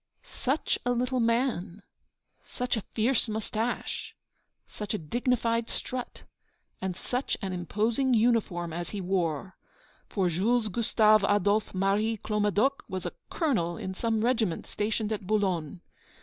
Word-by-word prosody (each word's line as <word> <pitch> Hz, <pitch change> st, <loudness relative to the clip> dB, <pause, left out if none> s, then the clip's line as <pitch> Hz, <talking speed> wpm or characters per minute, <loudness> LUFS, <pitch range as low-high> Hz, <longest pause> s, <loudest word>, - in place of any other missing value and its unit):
Such 270 Hz, +5 st, -1 dB
a 245 Hz, -, +2 dB
little 250 Hz, +1 st, 0 dB
man! 230 Hz, -5 st, 0 dB, 0.6 s
Such 250 Hz, 0 st, -2 dB
a 220 Hz, -, -2 dB
fierce 230 Hz, +3 st, 0 dB
moustache! 220 Hz, +2 st, -2 dB, 0.5 s
Such 210 Hz, 0 st, -4 dB
a -, -, 0 dB
dignified 230 Hz, -, 0 dB
strut! 250 Hz, -1 st, -5 dB, 0.6 s
And 185 Hz, -1 st, -2 dB
such 250 Hz, +7 st, -2 dB
an 190 Hz, -2 st, -3 dB
imposing 220 Hz, -, +1 dB
uniform 215 Hz, -8 st, +2 dB
as 175 Hz, 0 st, -4 dB
he 205 Hz, -, -4 dB
wore! 180 Hz, -2 st, -1 dB, 0.5 s
For 190 Hz, -3 st, +1 dB
Jules 215 Hz, +7 st, +2 dB
Gustave 215 Hz, 0 st, +4 dB
Adolphe 205 Hz, +1 st, +2 dB
Marie 205 Hz, +4 st, +2 dB
Clomadoc 210 Hz, +6 st, +1 dB
was 185 Hz, -1 st, -4 dB
a -, -, -3 dB, 0.2 s
colonel 210 Hz, -, 0 dB
in 190 Hz, -, -4 dB
some 225 Hz, +2 st, 0 dB
regiment 225 Hz, -9 st, +1 dB
stationed 215 Hz, +1 st, -1 dB
at 200 Hz, -3 st, -5 dB
Boulogne. 185 Hz, -6 st, 0 dB
215 Hz, 130 wpm, -29 LUFS, 190-235 Hz, 0.6 s, Gustave